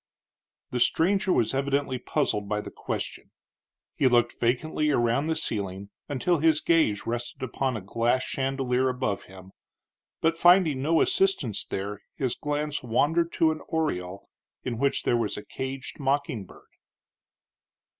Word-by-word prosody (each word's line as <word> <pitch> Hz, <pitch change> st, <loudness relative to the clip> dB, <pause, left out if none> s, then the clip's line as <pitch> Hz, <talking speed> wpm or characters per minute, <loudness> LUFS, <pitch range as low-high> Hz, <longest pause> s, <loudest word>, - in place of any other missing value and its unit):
The 125 Hz, -, -1 dB
stranger 190 Hz, +9 st, +3 dB
was 115 Hz, -9 st, +2 dB
evidently 140 Hz, -1 st, 0 dB
puzzled 105 Hz, -7 st, -1 dB
by 105 Hz, -, 0 dB
the -, -, -7 dB
question. -, -, -5 dB, 0.7 s
He 135 Hz, -, +3 dB
looked 120 Hz, -1 st, +2 dB
vacantly 150 Hz, +6 st, +1 dB
around 125 Hz, +2 st, +2 dB
the 160 Hz, -, +1 dB
ceiling 100 Hz, -4 st, -3 dB, 0.2 s
until 145 Hz, +5 st, +1 dB
his 155 Hz, 0 st, +4 dB
gaze 155 Hz, -14 st, +2 dB
rested 120 Hz, +2 st, -4 dB
upon 130 Hz, -1 st, -1 dB
a -, -, -6 dB
glass 115 Hz, +6 st, +1 dB
chandelier 130 Hz, -1 st, 0 dB
above 125 Hz, -6 st, -2 dB
him; 95 Hz, 0 st, -13 dB, 0.7 s
but, 165 Hz, 0 st, +2 dB
finding 175 Hz, -5 st, +5 dB
no 160 Hz, +3 st, +3 dB
assistance 190 Hz, -, +1 dB
there, 100 Hz, +1 st, -4 dB
his 130 Hz, -3 st, -1 dB
glance 150 Hz, 0 st, -2 dB
wandered 160 Hz, +8 st, +1 dB
to 160 Hz, -1 st, +3 dB
an 155 Hz, -, -5 dB
oriel, 100 Hz, -, -2 dB, 0.4 s
in 120 Hz, -3 st, -3 dB
which 140 Hz, +1 st, +1 dB
there 120 Hz, -, +2 dB
was 110 Hz, -4 st, -1 dB
a 105 Hz, -, -7 dB
caged 130 Hz, +2 st, -6 dB
mocking 135 Hz, -6 st, 0 dB
bird. -, -, -16 dB
130 Hz, 145 wpm, -27 LUFS, 115-150 Hz, 0.7 s, finding